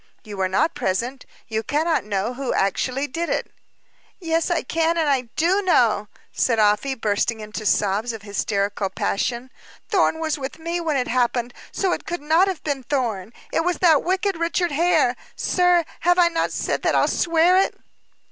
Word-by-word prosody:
You 210 -1 -8
were 190 -1 +1
not 310 - +1
present; 240 +8 -2 0.2
you 220 0 -2
cannot 310 +3 0
know 205 +3 -2
who 265 0 -3
actually 255 +8 0
did 330 +5 -4
it." - - -2 0.7
"Yes, 330 -2 0
I 345 - 0
can, 330 +4 0
and 275 -7 +1
do 360 +5 +2
know," 240 - +2 0.2
said 230 -3 +1
Afy, 215 +6 +2
bursting 220 0 -1
into 215 0 -5
sobs 205 +4 +1
of 225 -3 -8
hysterical 200 -1 -1
passion. 235 +6 -2 0.4
"Thorn 370 -5 +2
was 315 -2 -2
with 265 0 -6
me 335 +2 -3
when 315 -4 0
it 250 - -1
happened, 240 0 0 0.2
so 380 -2 0
it - - -3
could 345 +1 -3
not 325 +5 +4
have 375 -4 -4
been 285 -3 -2
Thorn. 230 -7 -2 0.2
It 325 - +2
was 360 +1 0
that 320 -6 +4
wicked 380 +1 0
Richard 340 +1 0
Hare. 310 -5 +2 0.2
Sir, 355 -2 +2
have 355 +1 +3
I 350 -1 +5
not 330 -1 -1
said - - -2
that - - +1
I'll - - +3
swear 335 +2 +3
it?" 390 - 0
275 Hz, 175 wpm, -22 LUFS, 225-335 Hz, 0.7 s, I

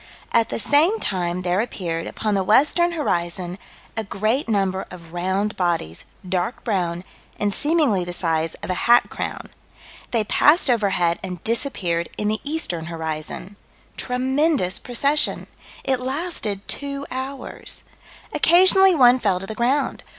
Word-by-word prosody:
At 230 -1 +2
the - - -2
same 300 - +3
time 180 -1 -1
there 180 +2 +1
appeared, 170 -8 -4
upon 215 -1 -2
the 195 -1 +1
western 300 - +3
horizon, 175 - -2 0.4
a 220 - -2
great 220 +6 -1
number 195 -3 0
of 170 -2 -12
round 190 +4 -1
bodies, 170 - -1 0.2
dark 185 +5 -2
brown, 180 -5 -1 0.3
and 205 -1 -1
seemingly 290 - +1
the 175 - -5
size 165 -2 -1
of - - -3
a 185 - -2
hat 240 - +5
crown. - - -5 0.6
They 230 -3 +1
passed 295 - +4
overhead 195 -7 +1
and 180 -3 -6
disappeared 190 -8 0
in 210 - -1
the 215 0 -2
eastern 285 - -1
horizon. 160 +4 -5 0.4
Tremendous 260 - 0
procession. 280 +5 +1 0.4
It 265 -2 0
lasted 255 - -3
two 280 0 -3
hours. 265 +1 -5 0.5
Occasionally 375 +2 +6
one 250 -3 +6
fell 195 -6 +1
to 190 - -6
the 220 - -6
ground. 250 +6 0
210 Hz, 140 wpm, -22 LUFS, 180-270 Hz, 0.6 s, Occasionally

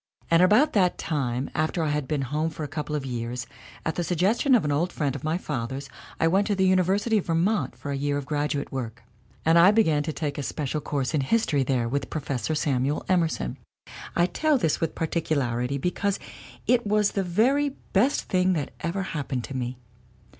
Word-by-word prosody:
And 165 +1 +6
about 215 +11 +5
that 185 -4 +3
time, 135 -4 -2
after 160 +2 0
I 155 - 0
had 150 -2 -1
been 145 -1 -1
home 150 +5 -1
for 155 0 -7
a - - -3
couple 150 +1 -4
of 145 -2 -3
years, 120 -1 -4 0.4
at 160 - 0
the 175 - -2
suggestion 195 - +3
of 220 - +2
an 150 - 0
old 165 +5 +1
friend 140 -3 -1
of 140 - -7
my 155 +2 0
father's 135 -4 -4 0.3
I 165 - +3
went 195 +4 +2
to 205 - +1
the 190 0 +2
Uni 185 0 +4
versity 205 +5 +2
of - - -7
Vermont 165 - +1
for 145 - -6
a - - -1
year 145 +1 0
of 145 - -4
graduate 145 -1 -2
work. 120 -3 -5 0.4
And 165 +1 +6
I 175 +3 +8
began 180 -9 +3
to 155 +2 -2
take 150 -2 -3
a - - -1
special 150 +1 -3
course 140 -1 -2
in 150 - +2
history 150 -2 +1
there 125 -3 +1
with 140 +4 -2
Professor 145 0 -2
Samuel 140 -1 0
Emerson. 165 - 0 0.6
"I 175 - +4
tell 305 - +2
this 160 - 0
with 165 - -1
particularity, 140 -6 -1
because 190 +6 -1 0.5
it 240 -3 +2
was 210 0 +3
the 200 - 0
very 245 +11 +2 0.2
best 245 +9 +3
thing 185 0 +2
that 150 -5 -2
ever 175 +4 -2
happened 140 -8 -3
to 135 - -7
me. 125 0 -3
155 Hz, 205 wpm, -26 LUFS, 140-185 Hz, 0.6 s, I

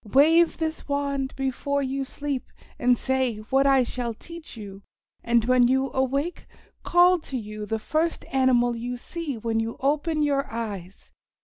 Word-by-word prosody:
Wave 325 +5 +5
this 320 -1 -3
wand 280 -1 -1
before 275 +1 -1
you 270 +1 -2
sleep 280 -1 -4 0.3
and 245 0 +4
say 260 -2 0 0.2
what 270 +1 +4
I 270 -2 +5
shall 240 -1 -4
teach 335 -1 -11
you, 200 -2 -9 0.4
and 235 -1 +2
when 250 0 +5
you 265 +1 +1
awake 275 +6 -1 0.3
call 355 +1 +5
to 275 -4 -5
you 215 -2 -6
the 225 - -1
first 315 +9 -1
animal 245 -2 +3
you 245 +2 -4
see 305 0 -5
when 225 0 -1
you 225 +1 -3
open 300 +3 +1
your 280 -1 0
eyes. 200 -5 -6
265 Hz, 155 wpm, -25 LUFS, 235-285 Hz, 0.4 s, Wave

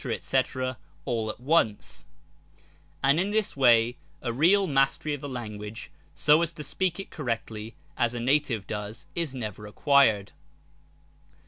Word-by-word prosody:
&c, - - +5 0.6
all 115 -2 -1
at 110 - -5
once, 125 -6 0 1.0
And 140 +4 +4
in 190 +3 +1
this 215 -1 0
way 120 -2 +4 0.3
a 120 -2 -1
real 180 +10 +4
mastery 135 0 +1
of 145 - -5
the 145 - -5
language, 105 -4 -7 0.2
so 150 +2 +5
as 170 -1 0
to 150 - -7
speak 180 +5 -1
it 195 - -7
correctly, 115 -5 -4 0.2
as 120 0 +1
a - - -3
native 125 -4 +1
does, 105 +2 -5
is 165 -6 -2
never 105 -4 -6
acquired. 110 -4 +3
130 Hz, 140 wpm, -27 LUFS, 110-150 Hz, 1.0 s, c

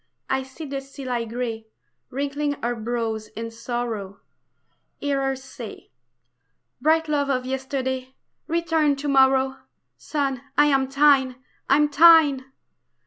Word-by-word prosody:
I 265 0 +1
see 265 +4 -9
the 275 -1 -4
sea 275 0 -10
lie 240 -2 -1
gray 225 -1 -4 0.4
Wrinkling 285 +2 -2
her 240 +1 0
brows 225 -1 -3
in 230 0 -5
sorrow, 225 -4 -4 0.8
Hear 280 -1 -1
her 270 0 0
say: 265 0 -10 0.9
"Bright 320 +1 +3
love 290 -2 0
of 255 -2 0
yesterday, 260 0 -3 0.3
return 325 -3 +1
to 280 +2 -5
morrow, 265 -1 +3 0.4
Sun, 275 -4 -2 0.2
I 295 - +6
am 270 -2 +2
thine, 275 -2 +4 0.3
am 295 +2 +5
thine!" 290 -3 +6
265 Hz, 125 wpm, -24 LUFS, 250-285 Hz, 0.9 s, I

